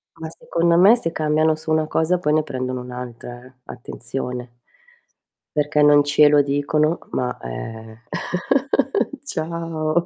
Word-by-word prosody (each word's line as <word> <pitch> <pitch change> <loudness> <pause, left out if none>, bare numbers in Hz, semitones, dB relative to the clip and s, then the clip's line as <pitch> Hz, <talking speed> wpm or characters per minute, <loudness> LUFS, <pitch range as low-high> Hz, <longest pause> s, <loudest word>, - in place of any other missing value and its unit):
Ma, 160 0 -7
secondo 170 +1 0
me, 200 +6 +7
se 165 -9 -3
cambiano 155 0 +1
su 160 0 -9
una 155 0 +2
cosa 160 +4 +1
poi 150 -4 0
ne 155 - +4
prendono 130 -1 -4
un'altra, 125 -1 -8
eh, 130 - -17
attenzione. 125 0 -6 1.0
Perché 150 0 +1
non 145 0 +6
ce 145 +1 +5
lo 145 0 +5
dicono 150 +3 0
ma 125 -1 -2
è 110 - -8 1.3
Ciao 165 - -2
150 Hz, 130 wpm, -21 LUFS, 125-160 Hz, 1.3 s, me